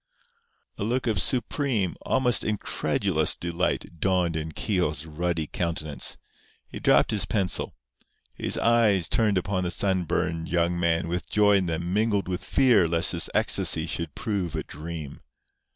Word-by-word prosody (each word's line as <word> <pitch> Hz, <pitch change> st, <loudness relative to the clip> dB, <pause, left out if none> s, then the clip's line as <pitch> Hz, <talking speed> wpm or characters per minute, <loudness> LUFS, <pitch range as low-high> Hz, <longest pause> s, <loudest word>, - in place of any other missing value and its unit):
A -, -, -2 dB
look 125 Hz, +4 st, -1 dB
of 110 Hz, -6 st, +1 dB
supreme, 125 Hz, -, +1 dB
almost 125 Hz, -3 st, +2 dB
incredulous, 105 Hz, -2 st, 0 dB
delight 85 Hz, -1 st, -3 dB
dawned 90 Hz, -2 st, +1 dB
in 80 Hz, 0 st, -4 dB
Keogh's 80 Hz, -5 st, -1 dB
ruddy 80 Hz, +1 st, -2 dB
countenance. 80 Hz, -3 st, -1 dB, 0.5 s
He -, -, -8 dB
dropped -, -, +3 dB
his 100 Hz, -3 st, +1 dB
pencil. 95 Hz, -5 st, 0 dB, 0.6 s
His -, -, -2 dB
eyes 110 Hz, -7 st, +3 dB
turned 105 Hz, -4 st, +1 dB
upon 95 Hz, 0 st, -1 dB
the 90 Hz, -, -1 dB
sunburned 90 Hz, -3 st, -1 dB
young 85 Hz, 0 st, 0 dB
man 85 Hz, -1 st, +1 dB
with 90 Hz, +1 st, -4 dB
joy 105 Hz, -1 st, +4 dB
in 95 Hz, -2 st, -1 dB
them 85 Hz, +2 st, -3 dB
mingled 105 Hz, -2 st, +1 dB
with 90 Hz, -1 st, -4 dB
fear 120 Hz, -10 st, +3 dB
lest 85 Hz, 0 st, +2 dB
his 85 Hz, -2 st, +1 dB
ecstasy 80 Hz, -1 st, +2 dB
should 85 Hz, -1 st, -3 dB
prove 95 Hz, -7 st, -3 dB
a -, -, -3 dB
dream. 75 Hz, -1 st, -8 dB
90 Hz, 145 wpm, -26 LUFS, 85-105 Hz, 0.6 s, joy